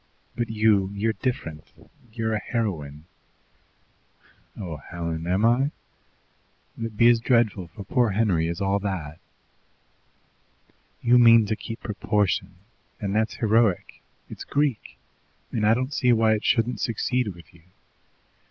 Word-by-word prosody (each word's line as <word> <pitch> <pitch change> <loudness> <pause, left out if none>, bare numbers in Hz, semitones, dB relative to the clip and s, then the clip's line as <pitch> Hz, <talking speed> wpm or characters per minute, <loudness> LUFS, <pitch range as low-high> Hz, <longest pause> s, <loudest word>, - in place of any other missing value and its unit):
But 120 -2 -2
you, 105 -3 +2
you're 110 +2 0
different; 80 - -4 0.5
you're 110 -1 -2
a 110 - 0
heroine." 80 - -4 1.5
"Oh, 85 -6 -6
Helen! 85 +1 -5
Am 95 +5 +2
I? 125 +4 +3 1.1
Will 115 - -4
it 110 -2 -13
be 115 - +6
as 120 -1 +4
dreadful 115 -6 +1
for 100 - -10
poor 120 +4 +1
Henry 95 -6 +1
as 85 +2 -4
all 100 +1 +1
that?" 85 -6 -5 1.8
"You 120 +1 +5
mean 115 -2 +7
to 110 +1 -1
keep 115 +2 -8
proportion, 100 -3 -1 0.4
and 100 -1 -3
that's 110 +1 0
heroic, 110 -4 +1 0.3
it's - - -9
Greek, 145 -5 -1 0.5
and 105 -3 0
I 110 - +5
don't 130 +4 -3
see 125 -3 +2
why 110 -1 +4
it 110 - -2
shouldn't 115 -2 +1
succeed 125 +2 -1
with 85 - -17
you. 85 - -19
110 Hz, 135 wpm, -24 LUFS, 95-115 Hz, 1.8 s, mean